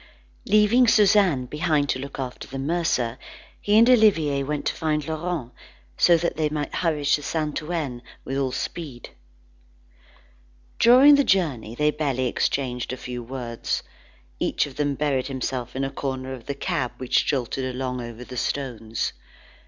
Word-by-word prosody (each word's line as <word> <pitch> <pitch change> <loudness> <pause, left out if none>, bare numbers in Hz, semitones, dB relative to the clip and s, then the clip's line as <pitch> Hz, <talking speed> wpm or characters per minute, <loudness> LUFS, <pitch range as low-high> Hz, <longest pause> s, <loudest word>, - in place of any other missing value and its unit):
Leaving 215 +4 +5
Suzanne 195 - +4
behind 150 +1 0
to 130 - -1
look 140 +1 -7
after 130 -2 -6
the 135 - -7
mercer, 135 -5 -1 0.4
he 205 +1 +3
and 230 +2 +7
Olivier 195 - +4
went 145 +1 -3
to - - +1
find 150 -2 -1
Laurent, 160 -5 -3 0.4
so 170 - +5
that 170 -1 -2
they 155 -1 +1
might 150 -1 -3
hurry 155 -4 -1
to 145 +1 +3
Saint 150 0 -2
Ouen 150 -7 -3 0.2
with 135 - -3
all 135 -2 0
speed. 135 -3 -6 1.7
During 255 +5 +8
the 285 0 +5
journey, 140 - 0
they 150 +3 +2
barely 140 -4 -1
exchanged 125 0 -1
a 130 - -4
few 125 -1 -6
words. 120 -1 -4 0.6
Each - - +1
of 140 -2 -10
them 145 -1 0
buried 140 -3 0
himself 130 -2 -4
in 135 - -1
a 135 - -2
corner 130 -1 -4
of 125 -3 -10
the 140 - -3
cab 125 -2 -2
which 130 -1 +1
jolted 130 -1 -1
along 125 -1 -3
over 120 0 -8
the 125 0 -9
stones. 115 -5 -2
140 Hz, 160 wpm, -24 LUFS, 130-160 Hz, 1.7 s, During